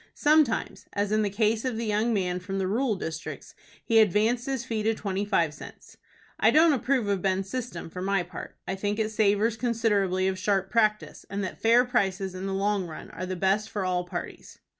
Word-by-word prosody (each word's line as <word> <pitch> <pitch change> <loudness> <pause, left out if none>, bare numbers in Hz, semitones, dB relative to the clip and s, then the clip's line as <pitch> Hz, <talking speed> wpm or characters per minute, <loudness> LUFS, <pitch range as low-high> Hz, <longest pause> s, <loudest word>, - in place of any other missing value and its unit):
Sometimes, 300 -5 +2
as 205 0 -1
in 215 0 +3
the 205 - +1
case 220 +2 +1
of 255 -4 -2
the 230 - -2
young 215 +2 +1
man 180 -4 0
from 195 +2 -5
the 190 - 0
rural 225 +4 0
districts, 160 -4 -6 0.3
he 225 -2 +4
advanced 220 +4 +2
his 265 -3 -2
fee 225 -2 -2
to 220 +1 +1
twenty 200 -1 -2
five 170 -7 +1
cents. - - -12 0.4
I - - +5
don't 315 0 +5
approve 235 -7 0
Ben's 190 0 0
system 245 -10 -4
for 180 +3 -7
my 195 -1 +1
part. 175 -1 -9
I - - -1
think 205 +2 -2
it 220 -1 -1
savors 215 +1 +2
considerably 205 -6 +1
of 190 -1 -2
sharp 195 0 0
practice, 215 -2 +1
and 200 0 -3
that 185 - -6
fair 235 +2 +5
prices 195 -6 0
in 185 +1 -5
the 195 - -2
long 200 -1 0
run 160 - -9
are 185 - -6
the 185 - -3
best 195 +4 +1
for 205 -3 -3
all 180 -1 0
parties. 180 - -7
205 Hz, 205 wpm, -27 LUFS, 190-225 Hz, 0.4 s, I